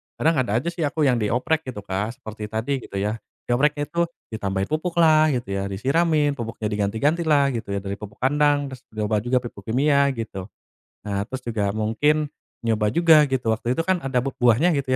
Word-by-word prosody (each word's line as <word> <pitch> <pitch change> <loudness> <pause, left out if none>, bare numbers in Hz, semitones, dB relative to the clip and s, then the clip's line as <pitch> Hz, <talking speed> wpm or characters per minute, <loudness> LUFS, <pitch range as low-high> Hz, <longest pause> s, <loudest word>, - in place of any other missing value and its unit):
kadang 165 +1 +2
ada 120 -5 0
aja 170 - -1
sih 170 -2 -2
aku, 155 +1 -1
yang 125 -4 +3
dioprek, 125 +8 0
gitu 115 -5 -5
Kak. 100 +4 -3
Seperti 110 -1 -8
tadi, 115 +6 -2
gitu 110 - -11
ya. 105 +3 -1 0.2
Diopreknya 145 +4 +1
itu 170 +2 0 0.2
ditambahin 100 -3 -2
pupuk 165 +3 -1
lah, 155 -1 +6
gitu 120 -4 -3
ya, 100 0 -1
disiramin, 145 - +1
pupuknya 115 -2 -4
diganti-ganti 110 +12 0
lah, 140 -3 +4
gitu 115 -5 -4
ya. - - 0
Dari 100 0 -4
pupuk 105 -1 -9
kandang, 145 +1 +2
terus 130 -1 -9
nyoba 105 0 0
juga 120 +4 0
pupuk 100 -5 -9
kimia, 140 +4 +3
gitu. 105 -5 -6 0.6
Nah, 100 -1 -1
terus 130 0 -5
juga 110 -4 -1
mungkin 130 +9 +1 0.4
nyoba 110 -2 +2
juga, 165 -1 +6
gitu. 120 -4 +1
Waktu 120 +2 -1
itu - - +2
kan, 185 -2 +1
ada 135 -1 -2
b 135 +1 -3
buahnya, 125 +9 +4
gitu 135 -2 -3
125 Hz, 195 wpm, -23 LUFS, 105-150 Hz, 0.6 s, lah